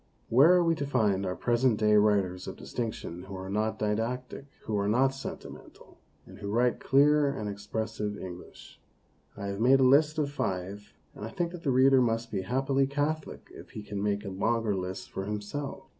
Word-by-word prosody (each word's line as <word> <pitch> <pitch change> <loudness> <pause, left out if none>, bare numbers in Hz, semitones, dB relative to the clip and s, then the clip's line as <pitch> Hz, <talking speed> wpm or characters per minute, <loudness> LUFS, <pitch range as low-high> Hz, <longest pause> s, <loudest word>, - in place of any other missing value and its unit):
Where 135 +9 +6
are 180 - +4
we 165 -1 +3
to 145 - -2
find 100 -7 +1
our 90 - -2
present 120 -1 +2
day 105 -1 +3
writers 100 -3 +2
of - - -6
distinction 110 -6 -5
who 95 0 -8
are 95 +1 -6
not 110 +2 -1
didactic, 115 +6 -3 0.2
who 110 - -3
are 100 - 0
not 125 +6 +3
sentimental, 135 +1 -10 0.3
and - - -14
who 100 -1 -5
write 120 +3 +1
clear 145 +1 +4
and 110 -6 -5
expressive 105 0 -4
English? 90 -2 -11 0.6
I 100 - -5
have 100 0 -4
made 130 +4 +5
a - - +4
list 150 +4 +4
of 145 -2 0
five, 100 -5 -4 0.2
and - - -10
I - - -4
think 175 -3 -2
that 175 -2 -8
the 145 - -1
reader 130 +1 +5
must 115 -1 0
be 100 -3 -1
happily 135 +6 +1
catholic 145 +2 -3
if - - -12
he 105 - -6
can 105 -1 -5
make 105 0 -1
a - - -4
longer 110 +2 0
list 95 0 -5
for 95 - -4
himself. 105 +8 -5
110 Hz, 195 wpm, -29 LUFS, 100-135 Hz, 0.6 s, Where